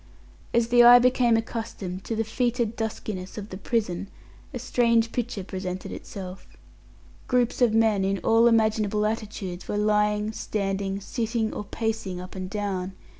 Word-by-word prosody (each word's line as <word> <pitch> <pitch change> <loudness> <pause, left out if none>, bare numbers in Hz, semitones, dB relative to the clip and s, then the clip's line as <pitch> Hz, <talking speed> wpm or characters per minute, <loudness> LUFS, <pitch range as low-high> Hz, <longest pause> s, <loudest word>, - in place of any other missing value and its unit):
As 235 0 +2
the 240 0 +6
eye 240 +1 +10
became 245 -2 +4
accustomed 220 -5 -5
to 225 - -2
the 225 - 0
foetid 235 0 -1
duskiness 215 -4 -5
of 210 0 -6
the 185 - -7
prison, 200 -3 -2 0.4
a 265 - -5
strange 235 -2 +2
picture 235 -5 -3
presented 185 -1 -5
itself. 190 -2 -8 0.8
Groups 250 -1 +1
of 230 -3 +4
men, 220 -3 +3
in 195 +1 +1
all 230 +1 +5
imaginable 215 -2 +2
attitudes, 210 -4 -4
were 205 - -2
lying, 210 0 +2
standing, 195 -2 -2
sitting, 225 0 -2
or 210 - -5
pacing 220 -4 -3
up 185 0 -9
and 185 -1 -5
down. 195 -3 -3
215 Hz, 150 wpm, -26 LUFS, 195-230 Hz, 0.8 s, eye